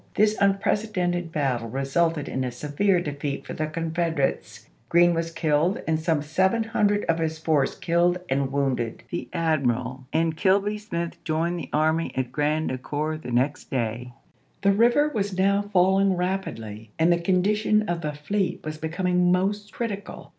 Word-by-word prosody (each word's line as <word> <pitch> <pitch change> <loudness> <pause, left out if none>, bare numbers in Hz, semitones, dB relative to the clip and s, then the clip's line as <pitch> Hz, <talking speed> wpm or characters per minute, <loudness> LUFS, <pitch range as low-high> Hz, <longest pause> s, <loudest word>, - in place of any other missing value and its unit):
This 215 +1 +3
unprecedented 195 -3 +1
battle 130 -7 -1
resulted 145 +4 0
in 130 - -2
a 125 - -2
severe 150 +9 +1
defeat 145 -3 -4
for - - -6
the 155 - -2
Confederates; 165 -2 -2 0.2
Green 175 0 +5
was 165 0 -1
killed 165 +2 +1
and 160 -1 +1
some 160 -2 0
seven 190 +9 +1
hundred 210 -2 +1
of 165 0 +1
his 160 -1 -1
force 155 -4 +1
killed 175 +1 +2
and 135 0 0
wounded. 135 -5 -1
The 175 - -4
admiral 130 -6 -1
and 160 0 +1
Kilby 200 +4 +2
Smith 170 -5 -5
joined 165 +2 -1
the - - -7
army 160 +2 +1
at 125 -2 -1
Grand 150 +2 0
Ecore 150 +4 -3
the - - -7
next 130 +4 0
day. 120 0 -3 0.5
The 200 - +5
river 240 +8 +4
was 200 -3 -2
now 200 +1 +3
falling 190 +1 +4
rapidly 115 - -4
and 165 +2 +4
the 170 - 0
condition 210 +4 +2
of 175 -4 -2
the 150 -2 -3
fleet 180 +5 -2
was 155 0 -5
becoming 180 +2 +1
most 205 +3 0
critical. 205 -3 -5
165 Hz, 160 wpm, -25 LUFS, 145-190 Hz, 0.5 s, Green